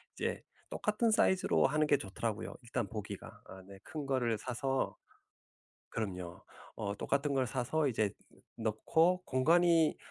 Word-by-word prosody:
이제 - - -2 0.3
똑같은 215 +2 +1
사이즈로 190 -3 +3
하는 155 +2 +2
게 145 - +5
좋더라고요 110 0 -4
일단 120 -3 -2
보기가. 105 -3 -6
아 95 0 -11
네. 100 -1 -12
큰 150 -2 -5
거를 125 -5 +1
사서 130 +3 -1 1.0
그럼요. 90 -5 -4 0.3
어 100 -1 -2
똑같은 140 +4 0
걸 130 -2 +2
사서 135 +5 0
이제 110 -4 +1 0.5
넣고 160 +12 +2
공간이 165 +4 +4
130 Hz, 275 characters per minute, -33 LUFS, 110-155 Hz, 1.0 s, 게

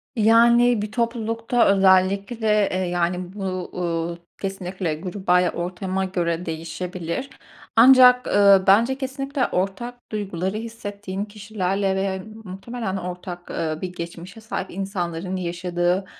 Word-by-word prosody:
Yani, 235 +1 +5
bir 210 0 -4
toplulukta 230 0 0
özellikle 195 +3 +3
de, 210 -2 +3
eee, 185 - -1
yani, 180 0 -1
bu, 210 - -10 0.3
uuu, 170 -1 -2 0.2
kesinlikle 185 -3 -3
gruba 180 +2 0
ya 180 -1 +1
ortama 185 +2 -3
göre 175 -2 -2
değişebilir. 170 +7 -5 0.5
Ancak, 250 +1 +7
ııı, 200 -1 +5
bence 230 +7 +4
kesinlikle 275 0 -2
ortak 235 +7 -4
duyguları 195 -2 -3
hissettiğin 205 -3 -6
kişilerle 200 -2 -2
ve 190 - 0
ya 190 -1 -2 0.2
muhtemelen 195 +1 -5
ortak, 180 -1 -7
eee, 155 -1 -3
bir 180 -1 -4
geçmişe 175 +4 -8
sahip 215 -3 -5
insanların 185 -2 -3
yaşadığ,ı 175 +1 -1
190 Hz, 120 wpm, -23 LUFS, 180-220 Hz, 0.5 s, Ancak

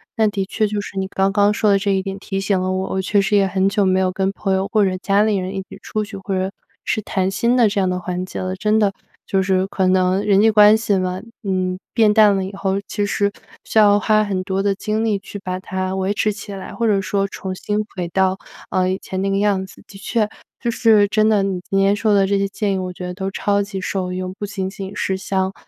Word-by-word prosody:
但 220 -2 +3
的 195 -2 -1
确 220 - 0
就 205 0 -2
是 195 - -9
你 190 0 -1
刚 195 0 0
刚 205 0 +3
说 210 0 +1
的 200 - +5
这 200 0 0
一 190 -1 +1
点 195 0 -5
提 195 0 -4
醒 195 -1 +1
了 185 0 -1
我， 190 0 -2
我 190 - -1
确 200 +1 +2
实 205 +1 +1
也 195 - +4
很 190 +1 +1
久 200 -1 +1
没 185 0 +3
有 185 -1 +1
跟 190 +1 -1
朋 195 -1 -1
友 190 +1 0
或 215 -2 +4
者 185 -1 0
家 200 +2 +2
里 215 -2 +2
人 185 +1 -3
一 190 - -2
起 - - -12
出 215 - -2
去， 205 -1 -8
或 195 0 -5
者 190 +1 -1 0.3
是 215 - -1
谈 190 -1 -1
心 235 +6 +1
的 235 -4 +5
这 200 - -1
样 190 - +2
的 180 0 -1
环 180 0 -4
节 - - -6
了。 185 0 -3
真 215 +3 +1
的 205 -2 +3 0.4
就 190 -1 +1
是 190 0 +1
可 190 -1 -1
能 185 +1 +2
人 200 -1 +4
际 220 - +5
关 210 0 +7
系 215 -3 +1
吗， 185 0 -2 0.2
嗯， 185 -2 -1 0.2
变 220 -3 +4
淡 210 -2 +5
了 190 - -1
以 190 - -5
后， 195 0 -1
其 205 -1 -1
实 200 0 0 0.3
需 - - -3
要 205 -1 +6
花 215 +1 +3
很 195 -3 -2
多 190 +1 -2
的 200 -1 +2
精 215 +3 -2
力 205 -3 +1
去 205 - -9
把 185 -1 -4
它 185 0 -3
维 190 +1 -1
持 215 0 +1
起 205 0 -9
来， 195 -1 -7
或 230 -1 0
者 200 -2 +3
说 195 +1 -1
重 190 -1 -6
新 205 +3 -3 0.2
回 175 -2 -3
到， 190 +1 +1 0.3
嗯， 185 0 +1
以 190 - -1
前 190 -1 -5
那 195 - 0
个 195 - +1
样 200 -2 +1
子。 - - -16
的 195 - -13
确 220 +1 0 0.3
就 235 -1 -1
是 220 -4 +4
真 215 0 +3
的， 205 -3 +3
你 190 -2 -2
今 195 - 0
天 195 +1 +3
说 215 +1 +1
的 195 -1 +4
这 200 +1 +1
些 200 - +1
建 200 0 -2
议， 190 - -1
我 185 -1 -4
觉 180 0 -7
得 180 - -4
都 190 +1 -3
超 200 +1 0
级 200 -1 -4
受 185 -1 -3
用， 185 0 -4
不 205 - -3
仅 190 -2 -3
仅 195 0 -7
是 190 - -1
像， 190 0 -1
195 Hz, 290 characters per minute, -20 LUFS, 190-205 Hz, 0.4 s, 关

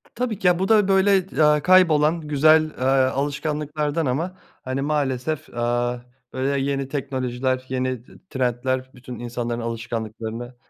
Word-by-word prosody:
Tabii 235 -5 -2
ki. 185 - +1
Ya, 180 -1 +4
bu 190 - 0
da, 210 -3 +5
böyle, 195 0 +4
eee, 185 - -2
ya 150 -1 +4
kaybolan, 165 -3 +4
güzel, 155 +1 +4
eee, - - -4
alışkanlıklardan 145 +3 0
ama, 165 +9 -2 0.3
hani, 130 +1 -3
maalesef, 145 0 -1
aaa, 120 +1 -1 0.3
böyle, 135 +1 0
yeni 135 -1 -2
teknolojiler, 130 -2 -2
yeni 130 -2 -2 0.3
trendler 130 0 -1
bütün 125 -2 -10
insanların 120 0 -3
alışkanlıklarını 115 0 -5
135 Hz, 135 wpm, -23 LUFS, 125-155 Hz, 0.3 s, da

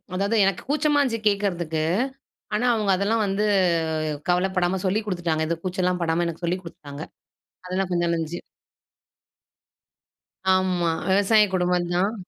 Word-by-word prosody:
அதாவது, 200 +4 +1
எனக்கு 195 -2 -1
கூச்சமா 295 0 +2
இருந்துச்சு 230 -5 -1
கேக்கிறதுக்கு. 175 -6 0 0.7
ஆனா, 230 +4 +1
அவுங்க 210 -3 +1
அதெல்லாம் 210 +3 +1
வந்து 195 +2 0 0.8
கவலப்படாம 180 0 +1
சொல்லிக் 210 +3 0
கொடுத்துட்டாங்க. 170 -5 -1
இந்த 170 - 0
கூச்சல்லாம் 180 -1 -1
படாம 165 +1 +1
எனக்கு 170 +1 -5
சொல்லிக் 180 +2 -1
குடுத்துட்டாங்க. 150 -3 -9 0.6
அதெல்லாம் 185 0 -2
கொஞ்சம் 175 -1 +1
நல்லா 170 - +1
இருந்துச்சு. 165 +1 -4 2.1
ஆமா, 185 -2 +2 0.2
விவசாய 205 +3 +5
குடும்பம் 180 -1 +1
தான். 190 +5 +1
185 Hz, 125 wpm, -24 LUFS, 175-200 Hz, 2.1 s, விவசாய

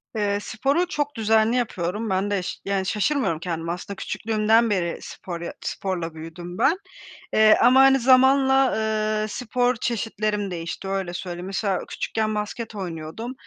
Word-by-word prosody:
Eee, 205 -1 0
sporu 275 +12 0
çok 290 -4 -2
düzenli 220 +1 +3
yapıyorum, 210 -2 -2
ben 195 +2 0
de 200 - +1
ş 180 - -4
yani, 195 -1 0
şaşırmıyorum 210 - 0
kendime 165 -1 -3
aslında 180 +3 -6
küçüklüğümden 220 +3 +1
beri 180 -4 -1
spor 170 -2 -7
ya 170 - -5
sporla 175 -4 -3
büyüdüm 165 +3 -8
ben. 275 +9 +3 0.6
Eee, 215 0 +6
ama, 255 +2 +6
hani, 270 0 +6
zamanla, 265 +1 +5 0.5
ııı, 215 - -1
spor 245 +2 0
çeşitlerim 215 -3 -2
değişti, 170 +2 -5
öyle 195 -2 -2
söyleyeyim. 175 -1 -5
Mesela 195 0 -1
küçükken 215 -1 -2
basket 210 +2 -4
oynuyordum 180 +5 -5
210 Hz, 145 wpm, -24 LUFS, 180-235 Hz, 0.6 s, Eee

